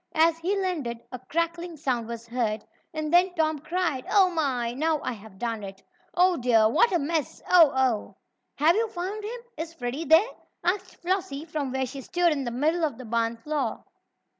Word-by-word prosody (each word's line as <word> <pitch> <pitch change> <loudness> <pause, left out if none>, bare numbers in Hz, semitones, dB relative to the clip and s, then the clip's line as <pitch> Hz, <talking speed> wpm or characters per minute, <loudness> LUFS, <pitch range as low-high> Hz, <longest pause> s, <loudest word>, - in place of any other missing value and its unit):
As 325 +1 +4
he 385 +4 0
landed, 305 -12 -2
a 255 - -6
crackling 335 +4 -2
sound 250 -6 -1
was 235 0 -6
heard, 230 -3 -2 0.3
and 310 0 -3
then 355 +1 +5
Tom 315 -2 +1
cried: 315 -3 -1
"Oh, 380 -3 +5
my! 260 -8 0
Now 310 +4 +1
I 255 - -1
have 210 -3 -13
done 230 0 -3
it! 195 -1 -9 0.3
Oh, 360 0 +4
dear! 230 -3 +4
What 460 - +4
a 355 - +3
mess! 315 0 -2
Oh! 340 -4 +7
Oh!" 255 -5 0 0.4
"Have 315 +4 +4
you 455 +1 +2
found 400 +2 -5
him? 470 +3 -5 0.2
Is 325 +1 -5
Freddie 270 +2 -4
there?" 320 - +6 0.4
asked 360 +2 -2
Flossie 360 -5 -1
from 300 -5 -3
where 265 0 0
she 270 +2 -7
stood 350 +5 +2
in 280 -3 -1
the - - -1
middle 310 +8 0
of 290 -7 0
the 255 - -9
barn 230 0 0
floor. 275 -1 -2
305 Hz, 190 wpm, -26 LUFS, 245-345 Hz, 0.4 s, Oh